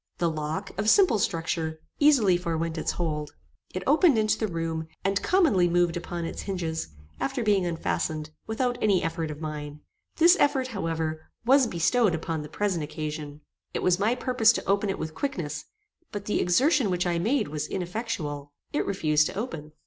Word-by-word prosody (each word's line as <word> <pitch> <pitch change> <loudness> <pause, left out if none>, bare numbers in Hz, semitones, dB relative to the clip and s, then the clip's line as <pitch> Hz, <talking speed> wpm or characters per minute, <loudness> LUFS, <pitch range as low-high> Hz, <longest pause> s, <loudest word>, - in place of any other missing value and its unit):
The 170 -1 +1
lock, 155 +5 -4
of 210 +2 +2
simple 365 - +5
structure, 160 -3 -1 0.2
easily 265 -11 +5
forewent 165 -2 -2
its 160 - -1
hold. 150 -3 -3 0.4
It 185 - -4
opened 300 -1 +5
into 215 -1 +3
the 215 -4 -1
room, 165 -1 -3 0.2
and 195 +1 +1
commonly 305 - +3
moved 175 -1 +2
upon 175 -1 -4
its - - -5
hinges, 170 -5 -3 0.3
after 265 -3 -1
being 200 -4 +2
unfastened, 155 -2 -2 0.2
without 245 +2 -1
any 200 -4 +3
effort 165 -1 -2
of 150 -1 -6
mine. 150 -1 -6 0.3
This 340 +2 +6
effort, 265 -3 +2
however, 160 -6 -3 0.2
was 265 +1 +5
bestowed 200 +2 +2
upon 160 -1 -3
the 150 - -8
present 185 -2 -1
occasion. 150 -1 -5 0.3
It - - -1
was 180 0 +3
my 220 +4 +2
purpose 250 -3 +4
to - - -4
open 200 +1 +1
it 195 - -1
with 160 0 -5
quickness, 160 - -3 0.5
but 205 -2 -5
the 210 - 0
exertion 255 - +3
which 180 -1 0
I 170 -1 0
made 225 - +1
was 150 0 -3
ineffectual. 170 -7 -4 0.2
It 295 - 0
refused 155 -6 +2
to - - -7
open. 165 - -5
175 Hz, 175 wpm, -27 LUFS, 160-220 Hz, 0.5 s, This